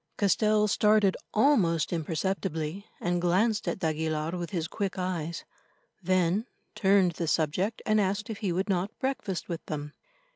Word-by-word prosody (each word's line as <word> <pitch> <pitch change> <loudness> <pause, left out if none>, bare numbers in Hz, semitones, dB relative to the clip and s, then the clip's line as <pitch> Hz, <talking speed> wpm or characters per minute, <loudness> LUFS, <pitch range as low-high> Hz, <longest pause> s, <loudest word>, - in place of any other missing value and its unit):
Castell 210 +1 +3
started 210 -1 +3 0.2
almost 200 - +3
imperceptibly, 165 +2 -2
and 175 0 0
glanced 195 +5 +2
at - - 0
d'Aguilar 160 -2 -1
with 175 -1 -4
his 170 -5 -2
quick 195 0 -3
eyes, 170 -3 -3 0.6
then 185 +4 +1 0.3
turned 195 -3 +4
the 170 0 -4
subject 170 +8 0
and 215 -1 +3
asked 200 +2 -1
if 220 -3 -6
he 200 -5 -1
would 185 +4 -1
not 190 +1 -1
breakfast 260 -9 -3
with 170 -2 -5
them. 150 -1 -5
185 Hz, 145 wpm, -28 LUFS, 165-205 Hz, 0.6 s, turned